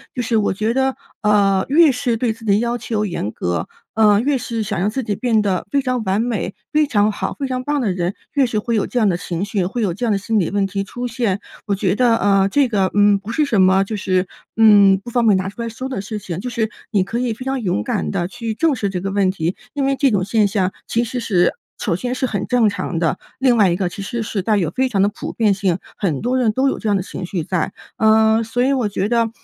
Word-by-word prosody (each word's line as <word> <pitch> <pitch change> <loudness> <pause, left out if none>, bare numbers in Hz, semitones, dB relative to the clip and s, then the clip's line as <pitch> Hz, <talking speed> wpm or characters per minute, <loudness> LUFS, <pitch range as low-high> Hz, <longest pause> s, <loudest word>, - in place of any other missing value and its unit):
就 250 - -1
是 230 -1 +1
我 205 - +1
觉 215 +4 -1
得， 265 +1 +1 0.3
呃， 200 -2 +3
越 310 +1 +6
是 250 -2 -1
对 230 -1 0
自 225 0 -14
己 200 -1 +3
要 240 +1 -1
求 220 -2 -2
严 110 - -3
格， 90 -2 -2 0.3
呃， 210 -2 +4
越 275 +2 +1
是 230 -2 -3
想 205 -3 -3
让 195 +4 +1
自 260 +5 -3
己 210 -2 -2
变 230 -1 +1
得 190 -4 -1
非 280 - +2
常 255 -3 -1
完 195 +1 +1
美、 225 -5 -2 0.2
非 305 -1 +3
常 210 -4 +2
好、 - - -4
非 275 - -2
常 255 -1 -3
棒 290 +2 0
的 210 - 0
人， 180 +1 -2 0.2
越 280 -2 +3
是 225 -3 -1
会 230 +2 -1
有 210 - 0
这 245 - -1
样 215 - +3
的 175 - 0
情 175 +1 -4
绪， 200 -2 -1
会 230 +6 -3
有 190 -5 0
这 240 +7 -3
样 225 - +1
的 200 - +2
心 215 +2 0
理 175 - 0
问 200 0 0
题 195 0 -2
出 245 +5 -5
现。 230 -5 -1 0.3
我 200 - +1
觉 190 -2 0
得， 240 0 +3
呃， 195 -2 +3
这 280 +4 +3
个， 200 -5 +1
嗯， 205 0 +4
不 205 +3 -7
是 300 +4 +1
什 220 -8 +2
么 190 +1 +4
就 215 +3 -5
是， 185 -1 0 0.3
嗯， 205 -3 +6
不 240 - -7
方 240 0 +1
便 210 - +5
拿 185 +1 -2
出 220 - -8
来 230 - -3
说 255 +4 -6
的 255 -7 -3
事 215 +2 -5
情。 180 -3 -6
就 250 +6 -4
是 225 -2 -1 0.2
你 200 -4 +2
可 225 +5 -3
以 245 -2 -1
非 255 +4 -9
常 265 -1 -1
勇 175 - -1
敢 80 -7 -2
地 175 - -1
去 230 +3 -5
正 315 +5 +1
视 210 -4 -2
这 185 -2 -3
个 195 +1 -3
问 195 -1 +2
题， 170 -1 -2 0.2
因 285 - -1
为 275 0 +1
这 275 0 +3
种 200 -3 +1
现 210 +2 +2
象 190 -2 0 0.2
其 235 - +1
实 240 +2 -4
是 185 -7 +2 0.3
首 - - 0
先 250 +4 -3
是 260 - -1
很 205 -6 -3
正 245 -4 +3
常 185 -3 -4
的。 170 +2 0 0.2
另 255 -2 +3
外 200 -4 +5
一 170 - +1
个 180 -1 -1
其 180 - -8
实 230 +3 -3
是 210 -2 -3
带 215 +3 +1
有 170 -5 0
非 260 0 +1
常 200 -6 0
的 200 - +4
普 - - -7
遍 215 -3 +2
性， 190 -3 0 0.2
很 170 -9 -1
多 250 +3 0
人 235 -4 +2
都 265 +4 +2
有 - - -3
这 220 - -4
样 205 - +3
的 190 - 0
情 190 - -6
绪 175 -2 -3
在。 175 -1 -2 0.2
呃， 220 0 +4
所 245 +2 -1
以 265 - +2
我 250 -6 +1
觉 200 0 -2
得， 230 -1 +2
215 Hz, 295 characters per minute, -19 LUFS, 195-240 Hz, 0.3 s, 越